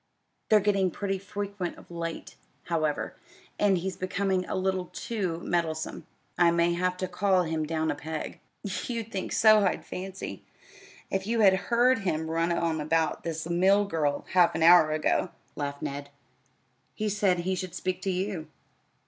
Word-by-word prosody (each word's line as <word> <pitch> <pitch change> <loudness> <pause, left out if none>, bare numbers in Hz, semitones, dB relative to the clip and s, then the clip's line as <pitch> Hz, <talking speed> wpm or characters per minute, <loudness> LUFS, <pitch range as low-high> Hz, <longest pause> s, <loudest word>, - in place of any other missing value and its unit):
They're 215 - +7
getting 195 -2 +2
pretty 195 +2 -3
frequent 200 -2 -5
of - - -15
late, 165 -1 -5 0.3
however, 155 -3 -1 0.5
and 200 -2 +4
he's 185 +2 -3
becoming 190 0 -1
a - - -3
little 185 -1 -1
too 190 -8 -3
meddlesome. 160 -3 -2 0.3
I 175 -1 +6
may 170 0 +2
have 180 +1 0
to 185 - -2
call 185 0 +2
him 160 -2 -2
down 160 0 0
a - - -3
peg." 155 +1 -6 0.2
"You'd 225 +4 -4
think 190 - -4
so, 215 -1 +6
I 190 - +2
fancy, 190 +1 -7 0.7
if 195 0 -1
you 230 0 +1
had 195 -2 +7 0.2
heard 245 +1 +4
him 160 -5 -2
run 165 +1 +1
on 165 -2 0
about 160 +1 0
this 160 -1 -4
mill 190 +4 +4
girl 150 -6 -1
half 180 -2 +4
an 160 - +1
hour 170 -2 +8
ago," 155 +3 +1 0.3
laughed 140 -1 -4
Ned. 140 0 -4 0.9
"He 215 - -2
said 195 -4 +2
he 185 +2 -1
should 185 -1 -4
speak 185 0 -2
to 195 - -2
you." 185 -3 -3
180 Hz, 165 wpm, -28 LUFS, 165-195 Hz, 0.9 s, hour